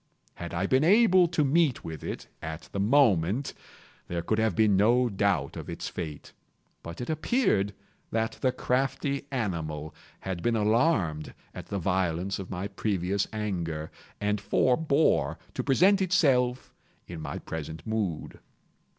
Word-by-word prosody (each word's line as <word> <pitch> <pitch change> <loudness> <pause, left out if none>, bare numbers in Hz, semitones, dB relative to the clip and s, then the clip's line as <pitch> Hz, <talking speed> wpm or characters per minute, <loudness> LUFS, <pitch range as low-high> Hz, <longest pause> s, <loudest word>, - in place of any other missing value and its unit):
Had 85 -1 -7
I 90 +2 -1
been 130 +7 +3
able 185 -1 +5
to 155 -2 +1
meet 145 -1 +2
with 80 -3 -7
it, - - -5
at 80 +1 -7
the 100 - -3
moment, 110 - +3 0.5
there 85 -1 -3
could 110 +5 0
have 110 -5 +1
been 110 -3 +4
no 120 +5 +4
doubt 95 -8 0
of - - -7
its - - -5
fate; 75 -4 -7 0.5
but 85 +6 -8
it 120 - -4
appeared 155 - +1 0.3
that 110 0 -2
the 130 - +3
crafty 135 +2 -1
animal 80 - -3 0.3
had 95 -2 -4
been 120 +3 +1
alarmed 105 - +1 0.2
at - - -8
the 100 - -3
violence 90 0 -1
of 95 - -7
my 95 +1 -3
previous 100 -1 -1
anger, 85 -8 -3 0.3
and 105 0 0
forebore 140 +7 +2 0.2
to - - -3
present 185 +9 +4
itself 135 -9 +2 0.3
in 85 -2 -8
my - - -5
present 80 0 -7
mood. 105 -8 -3
105 Hz, 145 wpm, -28 LUFS, 85-130 Hz, 0.5 s, able